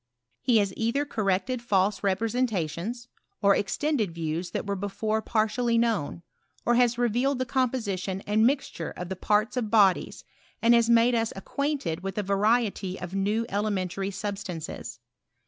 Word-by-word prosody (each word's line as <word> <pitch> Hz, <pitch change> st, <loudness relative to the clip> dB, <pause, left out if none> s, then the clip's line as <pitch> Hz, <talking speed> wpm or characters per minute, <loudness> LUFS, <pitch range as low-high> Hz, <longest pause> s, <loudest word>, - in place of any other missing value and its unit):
He 245 Hz, -3 st, +3 dB
has 200 Hz, -3 st, +1 dB
either 235 Hz, +6 st, 0 dB
corrected 215 Hz, 0 st, -1 dB
false 200 Hz, -3 st, +1 dB
repre 200 Hz, +3 st, 0 dB
sentations, 230 Hz, 0 st, -2 dB, 0.3 s
or 200 Hz, -1 st, +4 dB
extended 215 Hz, -, -1 dB
views 165 Hz, +2 st, -3 dB
that -, -, -3 dB
were 200 Hz, 0 st, -1 dB
before 215 Hz, +3 st, -2 dB
par 215 Hz, -1 st, +1 dB
tially 235 Hz, +1 st, 0 dB
known, 220 Hz, -8 st, 0 dB, 0.4 s
or 240 Hz, -, +3 dB
has 240 Hz, -1 st, +3 dB
revealed 245 Hz, +3 st, +1 dB
the 255 Hz, -, -1 dB
composition 220 Hz, -8 st, -1 dB
and 210 Hz, +2 st, +1 dB
mixture 265 Hz, -, 0 dB
of 180 Hz, 0 st, -5 dB
the 190 Hz, -, -3 dB
parts 210 Hz, +5 st, +1 dB
of 225 Hz, -4 st, -1 dB
bodies, 200 Hz, -5 st, +3 dB, 0.4 s
and 235 Hz, +1 st, +5 dB
has 235 Hz, -1 st, +4 dB
made 235 Hz, +1 st, +5 dB
us 225 Hz, -1 st, +1 dB
ac 195 Hz, -, -8 dB
quainted 280 Hz, -, -2 dB
with 195 Hz, +2 st, -5 dB
a 210 Hz, -, 0 dB
variety 200 Hz, -1 st, +1 dB
of 175 Hz, +1 st, -7 dB
new 205 Hz, +4 st, 0 dB
elementary 195 Hz, -2 st, -1 dB
sub 200 Hz, +1 st, -4 dB
stances. 165 Hz, -, -6 dB
210 Hz, 165 wpm, -27 LUFS, 190-235 Hz, 0.4 s, and